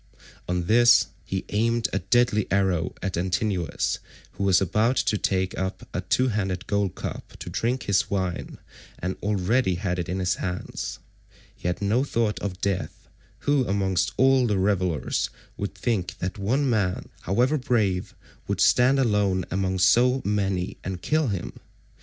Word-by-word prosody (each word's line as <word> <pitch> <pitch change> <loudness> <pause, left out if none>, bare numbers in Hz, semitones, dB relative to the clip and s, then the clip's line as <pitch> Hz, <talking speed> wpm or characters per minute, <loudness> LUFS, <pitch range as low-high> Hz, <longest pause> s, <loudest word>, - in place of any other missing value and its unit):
On 90 -1 0
this 120 +4 +5
he 95 -1 -4
aimed 115 +1 +1
a - - +1
deadly 120 -4 +2
arrow 95 -3 +1
at 95 -1 -2
Antinous, 90 0 -1 0.3
who - - -5
was 95 -2 +5
about 105 +7 +2
to 115 - +1
take 95 -2 0
up 95 0 -4
a 90 - -1
two 130 +8 +1
handled 95 -4 -2
gold 100 -2 0
cup - - -7
to - - -7
drink 125 +3 -1
his 100 0 +1
wine 95 -3 -2 0.4
and 90 +2 -3
already 105 +1 +1
had 90 0 -2
it 85 - -3
in 90 - -1
his 90 -1 0
hands. 90 -1 -4 0.6
He - - -5
had 90 +3 -2
no 110 +6 +2
thought 115 -6 0
of 95 -3 -4
death—who 125 +7 -2
amongst 95 -3 +1
all 130 -1 +4
the 105 -3 +1
revellers 90 -7 0 0.3
would - - -4
think 100 -7 -2
that 95 +4 -4
one 130 +8 +1
man, 105 -7 0
however 125 - +1
brave, 105 -8 0 0.3
would - - -2
stand 125 +3 +5
alone 105 -7 +2
among 95 0 0
so 125 +8 +4
many 95 -3 -1
and 95 -1 -5
kill 155 -1 +1
him? 95 -6 -4
100 Hz, 155 wpm, -25 LUFS, 95-115 Hz, 0.6 s, this